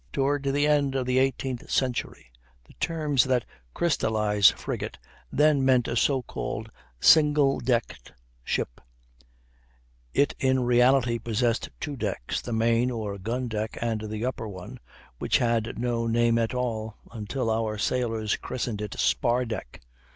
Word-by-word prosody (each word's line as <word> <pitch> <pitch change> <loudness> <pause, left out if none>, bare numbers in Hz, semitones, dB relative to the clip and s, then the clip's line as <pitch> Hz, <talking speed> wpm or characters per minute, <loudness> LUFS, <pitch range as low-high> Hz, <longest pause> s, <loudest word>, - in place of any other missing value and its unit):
Toward 140 +1 0
the 140 +1 +2
end 145 -2 +2
of 130 -1 0
the 125 +1 +2
eighteenth 130 -1 -1
century 125 - -2 0.3
the - - -19
terms 150 -6 +1
had 130 -3 +1 0.3
crystallized. 105 -10 +3
Frigate - - -5 0.3
then 150 -2 +3
meant 130 -2 +3
a 115 - -2
so 130 +2 +2
called 110 -1 -5 0.3
single 150 - +5
decked 120 - -2 0.3
ship; - - -3 1.3
it 140 - +2
in 130 -1 +2
reality 125 0 +3
possessed 115 +1 0
two 145 - -4
decks, 100 - -3
the 120 - -7
main 115 +2 +2
or 105 -5 -4
gun 120 +6 -2
deck, 110 -1 -3
and 110 -2 -2
the 110 +2 -3
upper 125 -3 -3
one, 100 +6 -9 0.4
which - - +2
had 115 -2 0
no 120 -1 -1
name 115 0 +2
at 115 +2 -1
all, 110 -4 -3
until 115 +2 -3
our 110 -1 -1
sailors 115 -1 0
christened 120 -4 -4
it 105 -2 -5
spar 125 +1 +2
deck. 110 - -6
120 Hz, 145 wpm, -26 LUFS, 110-130 Hz, 1.3 s, single